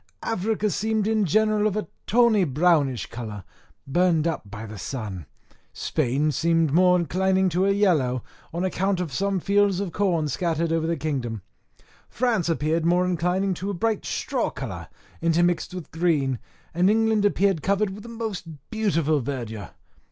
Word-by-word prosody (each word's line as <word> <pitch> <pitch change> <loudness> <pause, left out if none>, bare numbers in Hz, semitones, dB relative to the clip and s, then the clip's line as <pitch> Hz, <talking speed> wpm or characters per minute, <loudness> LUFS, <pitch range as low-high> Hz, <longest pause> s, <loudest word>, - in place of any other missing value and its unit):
Africa 215 0 0
seemed 220 +1 0
in 215 -1 +2
general 215 +4 +2
of 210 0 -2
a 210 - -3 0.2
tawny 230 -2 +4
brownish 145 -4 +2
colour, 110 -4 -7 0.4
burned 165 +2 +2
up 160 -11 -2
by 105 +2 -7
the 105 -2 -9
sun: 100 - -5 0.5
Spain 145 +1 0
seemed 165 -1 +1
more 180 +1 +5
inclining 190 +2 +1
to 180 +3 +1
a - - +4
yellow, 155 - +2 0.3
on 175 +3 -2
account 190 +1 0
of 170 -7 -3
some 195 +4 0
fields 200 0 +2
of 200 -3 -3
corn 170 -5 +1
scattered 165 +2 -1
over 165 -1 0
the 165 0 0
kingdom; 130 - -3 0.7
France 225 -9 0
appeared 160 0 0
more 175 +2 +3
inclining 180 +2 0
to 185 +3 -4
a 200 - -2
bright 220 +4 0
straw - - -1
colour, - - -6 0.3
intermixed 170 +1 +2
with 180 -3 -8
green; 150 -7 +1 0.3
and 180 +3 +3
England 220 -1 +3
appeared 200 -4 +2
covered 200 +2 +1
with 200 +2 -8
the 235 - -10
most 225 -6 -5 0.2
beautiful 165 -9 +1
verdure. 115 -6 -5
175 Hz, 160 wpm, -24 LUFS, 150-200 Hz, 0.7 s, more